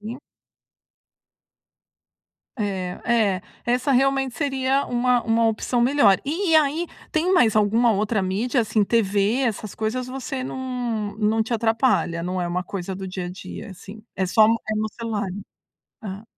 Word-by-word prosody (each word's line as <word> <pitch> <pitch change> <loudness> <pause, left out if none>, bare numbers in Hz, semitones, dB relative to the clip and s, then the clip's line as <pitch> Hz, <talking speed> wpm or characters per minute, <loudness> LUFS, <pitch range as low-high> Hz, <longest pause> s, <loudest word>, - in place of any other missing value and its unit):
Sim. 225 +5 -7 2.4
É. 190 -4 -3
É, 210 -6 +2 0.2
essa 250 +3 +1
realmente 270 -1 +2
seria 270 -1 0
uma 245 0 +2
uma 230 0 +2
opção 225 +2 -1
melhor. 240 -7 +4
E 325 +3 0
aí, 310 +3 +2 0.3
tem 330 +4 +1
mais 235 - +4
alguma 220 +3 +3
outra 210 0 0
mídia? 230 +7 0
Assim, 215 0 +1
TV, 210 +2 +1
essas 215 -4 -2
coisas, 235 +4 -2
você 265 0 -5
não 245 -5 -3
não 220 +1 +2
te 240 +2 -5
atrapalha, 225 -7 +1
não 180 +1 -2
é 175 - -2
uma 180 +1 -2
coisa 190 -1 -5
do 190 0 -6
dia 185 -1 -5
a - - -5
dia, 190 +3 -9
assim? 200 +3 -11
É 190 - +1
só 215 +4 +5
no 230 - +4 0.2
é 215 - 0
no 215 0 -1
celular. 215 -4 -2 0.8
Ah. 200 +1 -6
225 Hz, 155 wpm, -23 LUFS, 200-255 Hz, 2.4 s, só